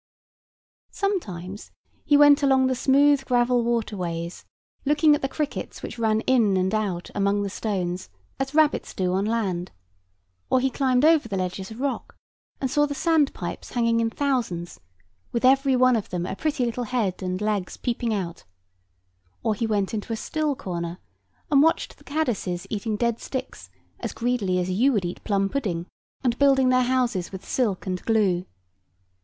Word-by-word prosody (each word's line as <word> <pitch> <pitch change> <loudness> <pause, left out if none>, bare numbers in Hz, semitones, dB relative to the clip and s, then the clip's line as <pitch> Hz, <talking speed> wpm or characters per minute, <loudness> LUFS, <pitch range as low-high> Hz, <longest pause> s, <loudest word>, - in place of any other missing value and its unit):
Sometimes 205 - -3 0.3
he 290 - +4
went 290 0 +7
along 265 -2 +4
the 260 - +2
smooth 280 +2 +4
gravel 245 -1 +2
water 230 -2 -1
ways, 170 -2 -4 0.4
looking 300 +1 +4
at 295 - +1
the 270 - -1
crickets 295 +1 -4
which - - -6
ran 220 -1 +2
in 225 -7 +3
and 185 +2 0
out 195 -5 -2
among 200 0 +1
the 200 - -3
stones, 185 -4 -3 0.3
as 270 +2 -3
rabbits 310 -1 +2
do 180 -1 0
on 195 +2 +1
land; 195 -6 -1 0.8
or 260 - +4
he 265 +1 +1
climbed 260 0 +2
over 315 -7 +4
the 195 - -2
ledges 185 +1 -3
of 220 +1 -10
rock, 275 0 -3 0.4
and 265 -2 -2
saw 295 0 +3
the 285 - -4
sand 320 -2 +2
pipes - - -6
hanging 230 -1 +2
in 230 0 +1
thousands, 230 -11 -2 0.5
with 235 +2 0
every 270 0 +4
one 255 0 +5
of 220 - -2
them 175 -1 -2
a - - -4
pretty 295 0 -1
little 240 +1 -2
head 215 -6 -1
and 185 0 -2
legs 210 -3 -2
peeping 235 -1 -2
out; 180 -5 -3 1.0
or 220 - +2
he 225 +2 -2
went 205 -2 0
into 215 +1 -4
a - - 0
still 300 +5 -1
corner, 175 -8 -4 0.5
and 280 -1 +6
watched 325 +2 +1
the - - -19
caddises 235 - -2
eating 215 +1 -2
dead 235 0 0
sticks 260 - -6 0.3
as - - -4
greedily 230 -7 0
as 180 0 0
you 240 +9 +3
would 200 -5 0
eat 175 - -5
plum 195 -2 +1
pudding, 195 -9 -2 0.4
and 240 -2 0
building 270 -2 +5
their 255 0 +4
houses 245 -8 0
with 190 0 -9
silk 215 -8 0
and 185 -1 -3
glue. 195 -6 +2
230 Hz, 175 wpm, -25 LUFS, 190-270 Hz, 1.0 s, went